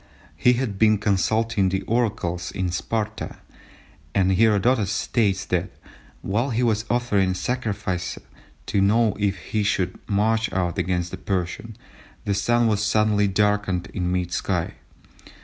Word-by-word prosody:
He 125 Hz, +10 st, +4 dB
had 120 Hz, -6 st, -2 dB
been 110 Hz, -1 st, +5 dB
consulting 105 Hz, 0 st, +1 dB
the 95 Hz, +1 st, -2 dB
oracles 95 Hz, -7 st, -1 dB
at 90 Hz, -2 st, -1 dB
Sparta, 110 Hz, +4 st, -3 dB, 0.8 s
and 95 Hz, -1 st, +3 dB
Herodotus 110 Hz, +2 st, +3 dB
states 105 Hz, -2 st, 0 dB
that -, -, -1 dB, 0.5 s
"while 115 Hz, +8 st, 0 dB
he 120 Hz, 0 st, 0 dB
was 110 Hz, -2 st, +1 dB
offering 105 Hz, -6 st, +1 dB
sacrifice 100 Hz, -5 st, -2 dB, 0.5 s
to 100 Hz, -, +1 dB
know 110 Hz, +1 st, +3 dB
if 100 Hz, -2 st, 0 dB
he 105 Hz, +4 st, -3 dB
should 95 Hz, -3 st, 0 dB
march 110 Hz, +2 st, +1 dB
out 90 Hz, -1 st, -1 dB
against 90 Hz, 0 st, -1 dB
the 95 Hz, -, -5 dB
Persian, 95 Hz, +4 st, -3 dB, 0.5 s
the 100 Hz, -, +1 dB
Sun 120 Hz, +4 st, +2 dB
was 105 Hz, -2 st, +2 dB
suddenly 105 Hz, -1 st, +2 dB
darkened 105 Hz, -2 st, 0 dB
in 90 Hz, -2 st, -1 dB
mid 90 Hz, -1 st, -1 dB
sky." -, -, -1 dB
105 Hz, 135 wpm, -23 LUFS, 95-110 Hz, 0.8 s, been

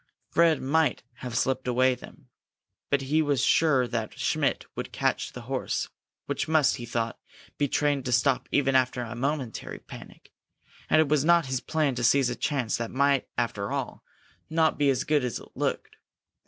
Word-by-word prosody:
Fred 165 Hz, -3 st, +3 dB
might 145 Hz, 0 st, +1 dB
have 125 Hz, -3 st, -5 dB
slipped 130 Hz, -1 st, 0 dB
away 130 Hz, +1 st, +3 dB
then, -, -, -12 dB, 0.6 s
but 140 Hz, -1 st, +2 dB
he 150 Hz, +4 st, +2 dB
was 145 Hz, -4 st, +1 dB
sure 135 Hz, -6 st, +3 dB
that 115 Hz, -3 st, -4 dB
Schmidt -, -, 0 dB
would -, -, -5 dB
catch -, -, -1 dB
the -, -, -8 dB
horse, -, -, -2 dB, 0.4 s
which -, -, -2 dB
must, 155 Hz, -3 st, +3 dB
he 120 Hz, -, -7 dB
thought, 115 Hz, -1 st, -2 dB, 0.4 s
be 145 Hz, -, +2 dB
trained 145 Hz, -1 st, 0 dB
to 125 Hz, -, -2 dB
stop 125 Hz, +2 st, +2 dB
even 135 Hz, -2 st, +2 dB
after 130 Hz, -1 st, +2 dB
a 115 Hz, 0 st, -6 dB
momentary 135 Hz, -1 st, -3 dB
panic. -, -, -13 dB, 0.6 s
And 155 Hz, -, +5 dB
it 155 Hz, -, +1 dB
was 145 Hz, -1 st, +2 dB
not 170 Hz, 0 st, +4 dB
his 130 Hz, -1 st, -1 dB
plan 155 Hz, -2 st, 0 dB
to 120 Hz, 0 st, -3 dB
seize 125 Hz, +1 st, +4 dB
a -, -, -3 dB
chance 130 Hz, -7 st, -1 dB
that 115 Hz, -1 st, -3 dB
might 140 Hz, 0 st, +2 dB
after 100 Hz, -4 st, -2 dB
all -, -, -4 dB, 0.5 s
not 160 Hz, -2 st, +2 dB
be 145 Hz, -1 st, +3 dB
as 130 Hz, -1 st, +1 dB
good 150 Hz, -3 st, +1 dB
as 125 Hz, -2 st, -2 dB
it -, -, -12 dB
looked. -, -, -3 dB
135 Hz, 180 wpm, -27 LUFS, 125-150 Hz, 0.6 s, And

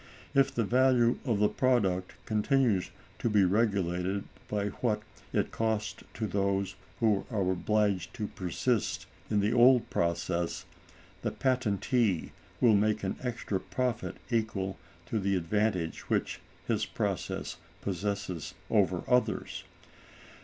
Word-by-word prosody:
If 135 Hz, 0 st, +4 dB
the 120 Hz, -4 st, 0 dB
value 125 Hz, +1 st, +4 dB
of 115 Hz, -6 st, +1 dB
the 105 Hz, +1 st, +4 dB
product 100 Hz, -9 st, +1 dB
continues 110 Hz, -2 st, +2 dB, 0.3 s
to 120 Hz, -, +1 dB
be 105 Hz, -2 st, +4 dB
regulated 95 Hz, -2 st, +1 dB, 0.2 s
by 105 Hz, -1 st, -1 dB
what 105 Hz, -3 st, +1 dB, 0.3 s
it -, -, 0 dB
costs 110 Hz, -1 st, -1 dB
to 110 Hz, -, -2 dB
those 100 Hz, -1 st, 0 dB, 0.3 s
who 105 Hz, -4 st, +3 dB
are 100 Hz, -5 st, +1 dB
obliged 100 Hz, -1 st, +1 dB
to 110 Hz, -, -2 dB
persist 100 Hz, +5 st, -1 dB, 0.2 s
in 105 Hz, -2 st, +2 dB
the 105 Hz, +3 st, +2 dB
old 125 Hz, 0 st, +5 dB
process, 85 Hz, 0 st, -1 dB, 0.6 s
the -, -, 0 dB
patentee 120 Hz, -, +1 dB, 0.3 s
will 120 Hz, -3 st, +6 dB
make 105 Hz, +1 st, +2 dB
an 95 Hz, -, -1 dB
extra 115 Hz, -6 st, -2 dB
profit 125 Hz, +1 st, -2 dB, 0.2 s
equal 105 Hz, -4 st, -1 dB, 0.3 s
to 110 Hz, +5 st, -1 dB
the 100 Hz, 0 st, +1 dB
advantage 90 Hz, -1 st, -1 dB
which -, -, 0 dB, 0.3 s
his -, -, +1 dB
process -, -, -2 dB, 0.3 s
possesses 100 Hz, -3 st, -3 dB, 0.2 s
over -, -, +3 dB, 0.2 s
theirs. 110 Hz, -, -5 dB
105 Hz, 125 wpm, -30 LUFS, 95-115 Hz, 0.6 s, will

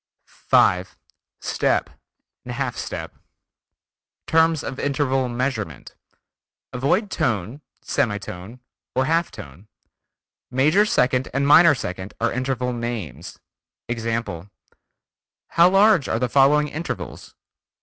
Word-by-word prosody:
5. 90 Hz, +1 st, +1 dB, 0.4 s
Step, -, -, 0 dB, 0.6 s
Half 125 Hz, 0 st, -3 dB
step: -, -, -6 dB, 1.1 s
Terms 160 Hz, -1 st, +3 dB
of 130 Hz, -, -6 dB
interval 135 Hz, -2 st, 0 dB
measurement. 120 Hz, -, -3 dB, 0.8 s
Avoid 180 Hz, -, 0 dB
tone, 115 Hz, +3 st, -2 dB, 0.2 s
semi 105 Hz, -3 st, 0 dB
tone 100 Hz, +5 st, -9 dB, 0.3 s
or 130 Hz, +1 st, +2 dB
half 165 Hz, +3 st, +1 dB
tone. 95 Hz, -, -12 dB, 0.8 s
Major 155 Hz, +11 st, +3 dB
second 125 Hz, -6 st, +1 dB
and 140 Hz, +1 st, +1 dB
minor 165 Hz, +1 st, +7 dB
second 95 Hz, -3 st, -6 dB
are 115 Hz, 0 st, 0 dB
interval 125 Hz, 0 st, -2 dB
names. 115 Hz, -8 st, -5 dB, 0.5 s
Example: 115 Hz, -6 st, -3 dB, 1.0 s
How 170 Hz, +1 st, +5 dB
large 195 Hz, -4 st, +4 dB
are -, -, 0 dB
the 125 Hz, +2 st, 0 dB
following 140 Hz, +4 st, +4 dB
intervals? 160 Hz, +4 st, -6 dB
125 Hz, 100 wpm, -22 LUFS, 115-145 Hz, 1.1 s, minor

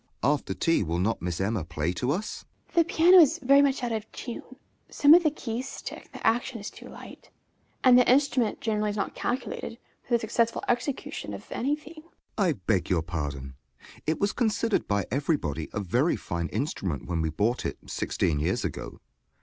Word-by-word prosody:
After 135 Hz, -7 st, +1 dB
tea 165 Hz, -, +2 dB
will 85 Hz, -3 st, -1 dB
not 105 Hz, +6 st, 0 dB
Miss 85 Hz, -1 st, -3 dB
Emma 100 Hz, -1 st, 0 dB
play 80 Hz, +1 st, -2 dB
to 125 Hz, +7 st, -2 dB
us? 185 Hz, +9 st, -2 dB, 0.3 s
EMMA. -, -, -21 dB
The 340 Hz, -, +6 dB
piano 350 Hz, +3 st, +7 dB
is 310 Hz, -6 st, +6 dB
very 275 Hz, +1 st, +5 dB
much 275 Hz, -2 st, +1 dB
out 240 Hz, -, -1 dB
of 220 Hz, -1 st, -4 dB
tune, 240 Hz, -, -6 dB, 0.5 s
some 290 Hz, +1 st, +6 dB
of 350 Hz, -, +8 dB
the 315 Hz, -, +3 dB
keys 260 Hz, -3 st, -5 dB
stick, -, -, -8 dB
the -, -, -8 dB
action 235 Hz, +2 st, +1 dB
is 200 Hz, -, -7 dB
too -, -, -12 dB
light, -, -, -12 dB, 0.5 s
and 250 Hz, -1 st, +7 dB
the 245 Hz, -, +4 dB
instrument 260 Hz, -4 st, +2 dB
generally 215 Hz, -1 st, 0 dB
is 205 Hz, -, -3 dB
not 200 Hz, -, -2 dB
calculated 245 Hz, -2 st, -3 dB, 0.2 s
for 245 Hz, -, -6 dB
the -, -, +2 dB
successful 230 Hz, +1 st, 0 dB
execution 245 Hz, +3 st, -2 dB
of -, -, -10 dB
any 280 Hz, +4 st, 0 dB
thing. 305 Hz, +2 st, -14 dB
JOHN -, -, -27 dB
S. -, -, -25 dB, 0.3 s
I 190 Hz, -4 st, +3 dB
beg 95 Hz, -, -1 dB
your 85 Hz, -4 st, +1 dB
pardon: 70 Hz, -5 st, -4 dB, 0.5 s
it 155 Hz, -, 0 dB
was 200 Hz, +1 st, +1 dB
considered 225 Hz, -2 st, 0 dB
by 100 Hz, -1 st, 0 dB
everybody 125 Hz, -, -1 dB
a -, -, -3 dB
very 120 Hz, -, +1 dB
fine 85 Hz, -1 st, -3 dB
instrument 100 Hz, -, -3 dB
when 85 Hz, -2 st, -1 dB
we 80 Hz, -, 0 dB
bought 105 Hz, +10 st, 0 dB
it, -, -, -3 dB
sixteen 75 Hz, -3 st, -1 dB
years 85 Hz, +5 st, 0 dB
ago. -, -, -6 dB
190 Hz, 200 wpm, -27 LUFS, -, 0.5 s, of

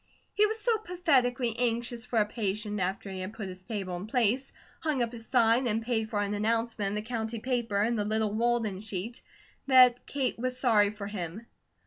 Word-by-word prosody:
He 425 Hz, +1 st, +4 dB
was 440 Hz, +1 st, -3 dB
so 450 Hz, 0 st, +1 dB
pathetically 265 Hz, -, +1 dB
anxious 240 Hz, 0 st, -1 dB
for 240 Hz, -, -1 dB
a 215 Hz, -, +5 dB
patient, 210 Hz, -1 st, -3 dB
after 190 Hz, +2 st, -2 dB
he 190 Hz, -, -5 dB
had 185 Hz, +3 st, -5 dB
put 215 Hz, -3 st, -6 dB
his 185 Hz, 0 st, -9 dB
table 195 Hz, -3 st, -4 dB
in 185 Hz, +4 st, -7 dB
place, 245 Hz, +3 st, +1 dB, 0.3 s
hung 300 Hz, -6 st, 0 dB
up 230 Hz, -, -3 dB
his 225 Hz, -2 st, -9 dB
sign, 240 Hz, 0 st, +3 dB
and 225 Hz, 0 st, 0 dB
paid 225 Hz, -2 st, -1 dB
for 210 Hz, -, -1 dB
an 205 Hz, 0 st, -1 dB
announcement 225 Hz, 0 st, 0 dB
in 200 Hz, -, -3 dB
the 210 Hz, -, -2 dB
county 230 Hz, -1 st, -3 dB
paper 235 Hz, -3 st, -1 dB
and 230 Hz, +3 st, +2 dB
the -, -, +1 dB
little 215 Hz, 0 st, 0 dB
Walden 225 Hz, -4 st, 0 dB
sheet, 215 Hz, +2 st, -5 dB, 0.5 s
that 250 Hz, -2 st, +6 dB
Kate 270 Hz, -4 st, -2 dB
was 255 Hz, +1 st, -1 dB
sorry 220 Hz, -6 st, +4 dB
for 205 Hz, -1 st, -7 dB
him. 200 Hz, +1 st, -5 dB
225 Hz, 200 wpm, -29 LUFS, 210-245 Hz, 0.5 s, that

